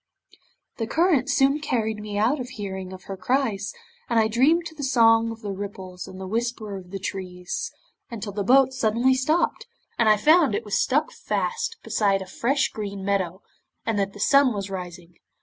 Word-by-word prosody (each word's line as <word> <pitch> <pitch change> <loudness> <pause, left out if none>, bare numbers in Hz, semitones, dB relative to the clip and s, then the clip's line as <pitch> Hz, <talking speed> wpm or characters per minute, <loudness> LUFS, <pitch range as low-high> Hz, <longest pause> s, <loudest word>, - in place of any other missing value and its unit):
'The 225 - -2
current 320 -3 +2
soon 275 +1 +3
carried 220 -7 -1
me 210 -1 -5
out 235 +8 +2
of 250 -1 -5
hearing 190 -5 -6
of 185 -1 -10
her 195 - -6
cries, 210 0 0 0.4
and 235 -1 +3
I 220 - +4
dreamed 280 +10 +3
to 335 - -7
the 310 - -9
song 230 -3 +4
of 225 0 -8
the 205 - -3
ripples 190 -2 -7
and 190 - -10
the 190 - -6
whisper 220 0 -3
of 185 -2 -9
the 195 - -5
trees, 180 -2 -5 0.4
until 220 -3 -5
the 205 - -2
boat 265 +4 +5
suddenly 240 +1 +2
stopped, 305 +6 0 0.3
and 230 -2 +4
I 215 - +6
found 310 - +4
it 425 - -3
was - - +1
stuck - - +1
fast 465 -1 -2
beside 195 -2 +1
a - - -11
fresh 260 +9 0
green 200 -2 -6
meadow, 190 -2 -1 0.4
and 220 -2 0
that 195 0 -1
the 205 - -12
sun 275 +2 +4
was 195 -1 -4
rising. 175 -2 -8
220 Hz, 190 wpm, -24 LUFS, 195-260 Hz, 0.4 s, I